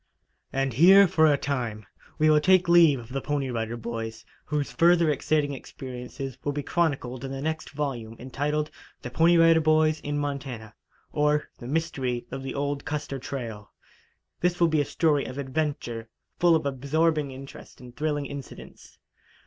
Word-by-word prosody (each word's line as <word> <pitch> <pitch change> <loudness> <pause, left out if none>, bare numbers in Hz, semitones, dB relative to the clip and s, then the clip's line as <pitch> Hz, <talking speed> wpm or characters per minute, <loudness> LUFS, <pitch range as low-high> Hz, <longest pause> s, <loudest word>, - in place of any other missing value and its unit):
And 135 -1 -1
here 190 - +7
for 160 -2 +4
a 145 - +3
time 120 -7 -3 0.3
we 155 0 +3
will 155 -1 +6
take 185 +2 +4
leave 170 -4 +6
of 115 -1 -11
the 135 +1 -3
Pony 140 -3 -2
Rider 115 0 -3
Boys, 115 -1 -6 0.2
whose 150 -1 -2
further 170 -2 +4
exciting 145 0 0
experiences 130 0 -8
will 145 - -1
be 145 0 -3
chronicled 135 -8 -1
in 135 - -5
the 135 - -5
next 160 +2 -3
volume, 130 -7 -4
entitled: 150 +4 -2 0.3
"The 125 - -6
Pony 165 +6 +4
Rider 165 -1 +6
Boys 155 0 +3
in 145 0 -3
Montana; 135 -7 -4 0.4
Or, 150 0 +1
the 120 - -8
Mystery 135 -5 -2
of 135 +1 -5
the 135 0 -5
Old 140 0 -2
Custer 145 -2 -4
Trail." 115 -6 -7 0.7
This 175 0 0
will 170 -1 +4
be 155 -2 +2
a - - -1
story 150 -2 +1
of 130 - -7
adventure, 135 -5 -3 0.3
full 175 -1 +5
of 155 -2 0
absorbing 145 +3 0
interest 135 +1 -11
and 125 -1 -13
thrilling 150 -1 -1
incidents. 140 -2 -10
145 Hz, 165 wpm, -26 LUFS, 130-155 Hz, 0.7 s, here